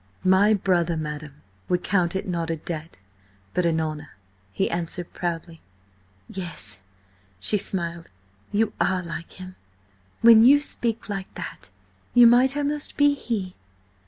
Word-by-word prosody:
"My 195 +3 +5
brother, 175 -4 +1
madam, 150 -1 -6 0.3
would 180 0 0
count 180 -2 +1
it 190 - -3
not 170 -2 -2
a 165 - 0
debt, 160 - -7 0.6
but 180 -1 +1
an 160 -1 +1
honour," 155 -4 -5 0.3
he 190 - 0
answered 170 0 -4
proudly. 170 -1 -4 0.7
"Yes," 135 - -4 0.6
she 210 - +2
smiled. 170 -3 -3 0.4
"You 220 +1 +1
are 185 -1 +1
like 170 -1 -7
him; 185 0 -10 0.6
when 230 -1 +8
you 280 +4 +7
speak 235 -5 -1
like 195 -2 -5
that - - -8 0.5
you 245 -1 +8
might 255 +4 +5
almost 290 0 -1
be 290 0 +5
he." 215 -9 -4
180 Hz, 135 wpm, -24 LUFS, 165-215 Hz, 0.7 s, when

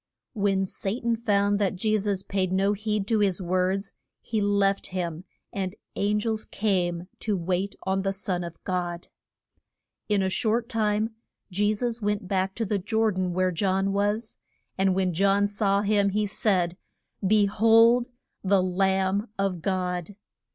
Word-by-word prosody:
When 195 -3 +1
Sa 195 +4 -4
tan 235 -1 0
found 205 -3 +1
that 200 -1 +1
Je 215 +3 +1
sus 200 -2 -1
paid 190 -2 -1
no 195 +2 +2
heed 210 -1 -2
to 220 +1 +1
his 195 -3 +2
words, 185 +2 -1 0.3
he 220 -2 -2
left 200 -1 +2
him, 175 -2 -4 0.3
and 190 -1 -3 0.2
an 210 +1 +1
gels 220 0 -2
came 180 -4 -1
to 210 -3 -1
wait 185 +3 -1
on 190 0 0
the 195 0 0
Son 190 -2 -2
of 170 -1 -7
God. 175 -1 -3 1.0
In 205 -2 +2
a 190 - +1
short 230 +2 0
time 220 -2 0 0.4
Je 205 +3 +2
sus 235 +1 -2
went 205 -1 -1
back 190 0 0
to 225 - -1
the 205 0 0
Jor 220 +3 +1
dan 185 -2 -1
where 185 +1 +1
John 195 +2 0
was, 205 +3 -1 0.4
and 190 -1 +2
when 185 -2 +1
John 200 +3 +3
saw 200 -1 +1
him, 205 -1 +3
he 210 +2 0
said, 185 -4 0 0.5
Be 210 +1 +4
hold 225 +4 +5 0.4
the 195 -1 +3
Lamb 190 +2 +1
of 195 -3 -1
God! 180 +1 -2
195 Hz, 160 wpm, -26 LUFS, 185-210 Hz, 1.0 s, hold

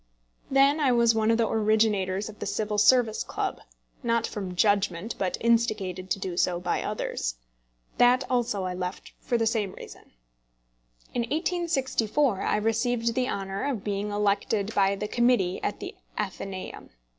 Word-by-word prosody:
Then 275 +3 +4
I 280 -4 +3
was 235 -1 +4
one 220 0 +1
of 225 - +4
the 230 -1 +2
originators 210 -3 +1
of 215 -1 -11
the - - -4
Civil 210 -1 -1
Service 230 -1 +4
Club - - -3 0.4
not 230 -2 +1
from 190 -3 -5
judgment, 200 0 +1
but 185 -2 -1
instigated 215 -6 +1
to - - +1
do 185 -2 -4
so 175 -1 +1
by 180 - -1
others. - - -3 0.6
That 245 +2 +5
also 240 -6 0
I 185 0 -2
left 180 +1 -5
for 240 - -1
the 225 - +1
same 220 -4 0
reason. - - -12 1.0
In 240 - 0
1864 280 - 0
I - - +1
received 230 +2 0
the 255 +1 0
honour 195 0 -3
of 230 -8 -3
being 205 0 -2
elected 205 +1 0
by 195 0 +3
the 210 +2 -4
Committee 240 -6 +2
at 205 - -2
the - - -6 0.2
Athenæum. 195 -2 -5
215 Hz, 155 wpm, -27 LUFS, 195-240 Hz, 1.0 s, That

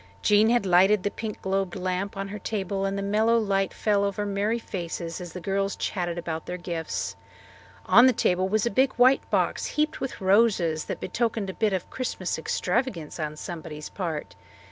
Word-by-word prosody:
Jean 210 +1 +5
had 240 -3 +2
lighted 190 +2 +5
the 205 - 0
pink 220 -2 -5
globed 190 -1 -1
lamp 185 +1 -2
on 195 0 -4
her 210 +1 -6
table 195 -2 -2
and 195 0 -1
the 200 - -2
mellow 215 +3 +3
light 195 -3 +1
fell 205 -2 +1
over 200 +1 -1
merry 205 +3 0
faces 170 -5 -5
as 175 -1 -8
the 180 - -5
girls 195 +2 -1
chatted 175 -2 -2
about 165 -2 -4
their 180 - -3
gifts. 170 -2 -4 0.7
On 235 +7 +7
the - - +6
table 185 -5 +1
was 215 +2 +1
a 235 - 0
big 260 +5 +3
white 255 +2 +4
box - - +1
heaped 305 0 0
with 265 - -4
roses 190 -5 +3
that - - -5
betokened 220 -1 -1
a - - -13
bit 215 +1 +1
of 185 -2 -3
Christmas 190 -10 -3
extravagance 180 - -2
on 150 -1 -3
somebody's 155 -2 -7
part. 165 -6 -4
195 Hz, 190 wpm, -26 LUFS, 180-215 Hz, 0.7 s, On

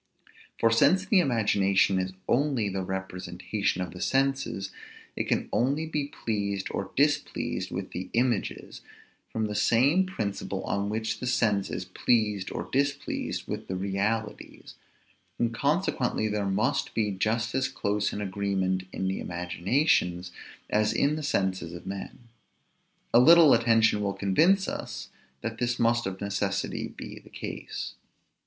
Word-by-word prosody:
For 115 - +4
since 185 +11 +4
the 195 0 +4
imagination 100 - +3
is 95 0 -2
only 130 -5 +2
the 95 0 -2
representation 95 0 -3
of 90 - -6
the 90 - -9
senses, 135 -7 0 0.4
it - - -1
can - - 0
only 140 +6 +1
be 150 -3 -2
pleased 100 -6 -2
or 95 -1 -3
displeased 145 +2 0
with - - -5
the 90 +1 -5
images, 120 -2 -1 0.5
from 110 -1 -1
the 105 - -3
same 140 - +3
principle 105 - -3
on 100 0 -1
which 110 0 -2
the 125 - -4
sense 105 -5 +1
is 90 - -4
pleased 105 +1 +1
or - - -4
displeased 140 +1 -1
with - - -5
the 95 - -3
realities; 100 +3 -3 0.6
and 115 -1 0
consequently 140 - 0
there 105 -1 -1
must 100 +3 0
be 105 -2 +1
just 110 +4 0
as 130 0 +1
close 105 0 -1
an 105 - -4
agreement 95 -2 -1
in 95 - -2
the 95 - -1
imaginations 90 - 0 0.4
as 105 0 +2
in 145 +2 +2
the 155 - -4
senses 95 - -1
of 85 - -9
men. 100 +4 -6 0.9
A 120 - +8
little 160 +3 +8
attention 115 -2 +4
will 100 -1 0
convince 170 - +3
us - - -5 0.3
that 115 0 -4
this 120 0 0
must 120 -1 +2
of 95 0 -5
necessity 100 -1 -2
be - - -9
the - - -18
case. - - -6
105 Hz, 145 wpm, -28 LUFS, 95-125 Hz, 0.9 s, A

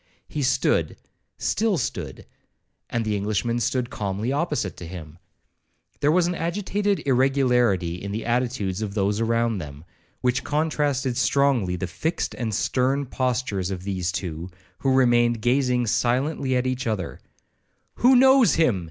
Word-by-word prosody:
He 150 - -4
stood—still 180 - -1
stood, 90 - -4 0.6
and 115 -1 -1
the 105 -1 0
Englishman 110 +4 -1
stood 125 +1 -1
calmly 100 +4 -2
opposite 145 - -1
to 85 - -8
him. 85 -2 -9 0.8
There 145 0 +3
was 175 +1 +3
an 175 - 0
agitated 195 +2 -1
irregularity 125 -9 +2
in 100 - -5
the 110 +2 -4
attitudes 120 -5 -1
of 105 -2 -4
those 100 0 +1
around 115 -2 +1
them, 75 -1 -9 0.4
which 125 0 +1
contrasted 145 -4 0
strongly 130 -10 +2
the 95 - -3
fixed 160 - -3
and 115 -3 -3
stern 130 +6 0
postures 125 -8 -1
of 95 -2 -5
those 95 -2 -2
two, 85 -1 -5 0.3
who 135 - +1
remained 120 -3 +3
gazing 125 +1 +1
silently 130 +4 0
at 125 0 +1
each 130 -1 -2
other 100 -6 -3 0.8
'Who 255 +2 +5
knows 265 -1 +6
him?' 130 - +2
120 Hz, 140 wpm, -24 LUFS, 100-140 Hz, 0.8 s, knows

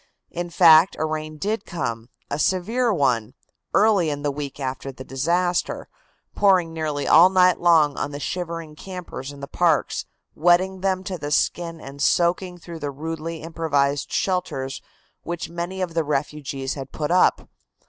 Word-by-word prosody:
In 175 0 -4
fact, 165 0 +6
a 155 - 0
rain 155 0 -4
did 205 +5 -2
come, 120 -8 -4 0.2
a 145 - -3
severe 225 +9 +1
one, 125 - 0 0.4
early 205 -6 +4
in 145 -1 -4
the 145 - +1
week 140 0 -6
after 135 0 -4
the 130 0 -10
disaster, 170 +7 -1 0.5
pouring 185 -5 +3
nearly 155 -3 -2
all 170 +4 +8
night 185 -1 +4
long 160 -4 +4
on - - -2
the 145 0 -6
shivering 165 -1 -4
campers 180 -7 -7
in 140 -1 -12
the 140 - -6
parks, 165 -2 +1 0.3
wetting 180 +3 +2
them 190 -1 0
to 185 -2 -5
the 145 - -4
skin 165 +2 0
and 140 -1 -9
soaking 180 +3 +1
through 170 -1 -9
the 145 -2 -3
rudely 160 +3 -5
improvised 145 -4 0
shelters 150 -8 -2 0.4
which 170 0 -5
many 175 +2 -4
of 170 -2 -4
the 165 -1 +1
refugees 140 -2 -3
had 135 -2 -7
put 150 +1 -3
up. 180 - +3
165 Hz, 160 wpm, -23 LUFS, 145-180 Hz, 0.5 s, all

